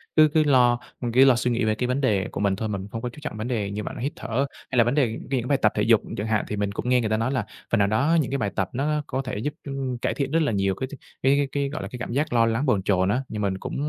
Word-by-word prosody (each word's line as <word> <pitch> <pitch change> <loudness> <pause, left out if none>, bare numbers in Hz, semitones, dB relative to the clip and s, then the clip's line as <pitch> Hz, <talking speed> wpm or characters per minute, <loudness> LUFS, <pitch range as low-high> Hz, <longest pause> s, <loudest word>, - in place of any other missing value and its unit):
cứ 155 -1 +7
cứ 155 -1 +4
lo 125 -4 +4 0.2
mình 120 -2 -2
cứ 130 +3 +6
lo 130 -2 +6
suy 125 +1 0
nghĩ 120 -1 0
về 110 0 +1
cái 125 +2 -1
vấn 130 +2 0
đề 105 -8 +1
của - - -5
mình 100 -2 +2
thôi, 110 - -3
mình 100 -2 -3
cũng 100 - -9
không 115 - -4
có 125 - -3
chú 120 - -16
trọng 145 -8 -5
vấn 110 - -3
đề 105 -5 -2
như 105 +1 -4
bạn - - -6
nói, - - -6
hít 140 - -2
thở 130 +5 -1 0.3
hay 130 - -1
là 120 - +7
vấn 120 +4 0
đề 145 -5 +3 0.2
cái 135 -1 +1
những 120 - -4
bài 140 - +3
tập - - +4
thể - - +1
dục - - +5 0.2
chẳng 105 - -2
hạn, 110 -2 +1
thì 105 - -3
mình 100 -1 -1
cũng 125 - -3
nghe 125 -1 +4
người 110 - -1
ta 110 - +1
nói 115 +4 0
là 125 -6 -1 0.3
phần 115 - +3
nào 100 - +4
đó 145 +11 +2
những 135 - -4
cái 140 - 0
bài 105 -5 -1
tập 95 -2 0
nó 150 +3 0
có 130 - -2
thể 130 -6 -5
giúp, 145 +7 -2
ưm, 135 -3 -3
cải - - -1
thiện 140 -1 -2
rất 165 - +3
là 150 - +1
nhiều 100 -2 +1
cái 130 - -4
th - - -14 0.3
cái 135 +2 +4
cái 145 - +1
cái, 140 -1 -1
gọi 155 +3 -5
là, - - -5
cái 125 - -7
cảm 115 - -5
giác 145 +2 -1
lo 115 -1 +4
lắng 115 +5 0
bồn 105 -9 +2
chồn 95 -1 +2
á, 125 +6 +1
nhưng 105 - -4
mình 95 -2 0
cũng, - - -6
120 Hz, 360 wpm, -25 LUFS, 105-135 Hz, 0.3 s, cứ